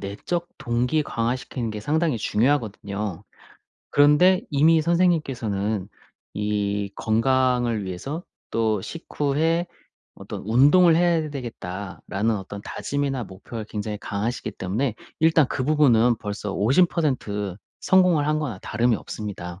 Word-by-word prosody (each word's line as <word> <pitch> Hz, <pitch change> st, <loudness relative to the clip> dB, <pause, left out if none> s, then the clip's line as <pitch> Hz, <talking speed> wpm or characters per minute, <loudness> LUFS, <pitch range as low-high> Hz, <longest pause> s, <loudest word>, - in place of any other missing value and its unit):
내적 170 Hz, -, -4 dB
동기 125 Hz, +3 st, 0 dB
강화시키는 120 Hz, -1 st, -2 dB
게 105 Hz, -, -5 dB
상당히 155 Hz, +2 st, 0 dB
중요하거든요. 105 Hz, -, -1 dB, 0.7 s
그런데 150 Hz, +6 st, +5 dB
이미 160 Hz, +3 st, +4 dB
선생님께서는 125 Hz, -, 0 dB, 0.4 s
이 100 Hz, -1 st, -1 dB
건강을 120 Hz, -1 st, +1 dB
위해서 135 Hz, -, -5 dB, 0.3 s
또 110 Hz, -2 st, +1 dB
식후에 160 Hz, -, -1 dB, 0.5 s
'어떤 -, -, -8 dB
운동을 145 Hz, +9 st, +5 dB
해야 170 Hz, -2 st, +2 dB
되겠다.'라는 105 Hz, -4 st, -4 dB
어떤 100 Hz, +1 st, -7 dB
다짐이나 140 Hz, -3 st, -2 dB
목표가 105 Hz, +4 st, -8 dB
굉장히 105 Hz, 0 st, -4 dB
강하시기 110 Hz, +4 st, -3 dB
때문에 105 Hz, +7 st, -2 dB, 0.3 s
일단 160 Hz, -2 st, +5 dB
그 130 Hz, -, -1 dB
부분은 125 Hz, -6 st, +4 dB
벌써 105 Hz, -1 st, -4 dB
50% 115 Hz, -, +1 dB, 0.2 s
성공을 180 Hz, -6 st, +4 dB
한 155 Hz, 0 st, +1 dB
거나 135 Hz, -11 st, -4 dB
다름이 120 Hz, 0 st, +1 dB
없습니다. 95 Hz, -6 st, -7 dB
120 Hz, 285 characters per minute, -24 LUFS, 105-150 Hz, 0.7 s, 그런데